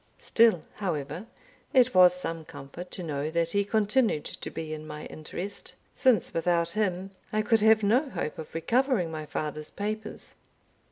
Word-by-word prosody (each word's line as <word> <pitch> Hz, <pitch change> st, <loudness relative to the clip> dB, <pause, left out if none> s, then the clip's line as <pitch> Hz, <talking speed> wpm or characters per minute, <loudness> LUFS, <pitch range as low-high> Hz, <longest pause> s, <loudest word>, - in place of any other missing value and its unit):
Still, 225 Hz, -8 st, +3 dB
however, 175 Hz, 0 st, -3 dB, 0.5 s
it 255 Hz, -1 st, +5 dB
was 180 Hz, -1 st, +7 dB
some 165 Hz, -2 st, -4 dB
comfort 160 Hz, +4 st, -9 dB
to 180 Hz, -, -6 dB
know 150 Hz, -2 st, -2 dB
that 165 Hz, +1 st, 0 dB
he 200 Hz, +2 st, +2 dB
continued 210 Hz, -, +1 dB
to -, -, -6 dB
be 160 Hz, -1 st, -5 dB
in 155 Hz, 0 st, -7 dB
my 150 Hz, 0 st, -7 dB
interest, 180 Hz, +6 st, -7 dB, 0.2 s
since 255 Hz, -8 st, +2 dB
without 170 Hz, 0 st, +1 dB
him 195 Hz, -3 st, -1 dB, 0.2 s
I 215 Hz, 0 st, +1 dB
could 225 Hz, +1 st, +3 dB
have 220 Hz, 0 st, +5 dB
no 250 Hz, +8 st, +3 dB
hope 155 Hz, -, -4 dB
of 160 Hz, -, -9 dB
recovering 230 Hz, -, +1 dB
my 155 Hz, -1 st, -5 dB
father's 150 Hz, 0 st, -4 dB
papers. 215 Hz, +1 st, -5 dB
180 Hz, 160 wpm, -28 LUFS, 160-215 Hz, 0.5 s, was